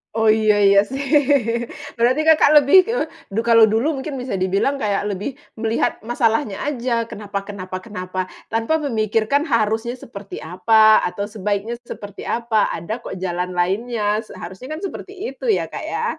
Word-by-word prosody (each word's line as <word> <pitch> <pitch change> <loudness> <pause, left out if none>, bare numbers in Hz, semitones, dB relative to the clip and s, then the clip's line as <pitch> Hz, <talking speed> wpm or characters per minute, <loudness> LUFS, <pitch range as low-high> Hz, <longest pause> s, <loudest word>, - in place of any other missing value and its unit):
Oh 220 -1 +3
iya 215 -1 +4
iya 200 0 +6
sih 270 +5 -5 0.9
Berarti 250 +5 +3
Kakak 315 -2 +5
lebih, 285 +7 +7
eee, 465 +4 -1 0.3
du 225 - +1
kalau 230 -1 +6
dulu 230 +8 0
mungkin 275 +2 -5
bisa 250 -6 -3
dibilang 195 +9 +1
kayak 205 -4 -1
lebih 205 +7 -4 0.2
melihat 225 +1 0
masalahnya 225 -2 0
aja, 240 -5 -1
kenapa 200 -1 -5
kenapa 185 -2 -7
kenapa 185 -3 -6 0.3
tanpa 225 +8 +1
memikirkan 220 +2 +1
harusnya 225 +1 0
seperti 205 -5 -9
apa, 215 +6 +4
atau 200 +3 -2
sebaiknya 210 +1 -3
seperti 205 -4 -8
apa, 230 -2 +1
ada 215 +9 -5
kok - - -7
jalan 180 0 -3
lainnya, 210 +3 0
seharusnya 215 - -8
kan - - -9
seperti 390 0 -7 0.2
itu - - -4
ya, 430 - +2
Kak - - -7
ya? - - -3
220 Hz, 155 wpm, -20 LUFS, 200-240 Hz, 0.9 s, lebih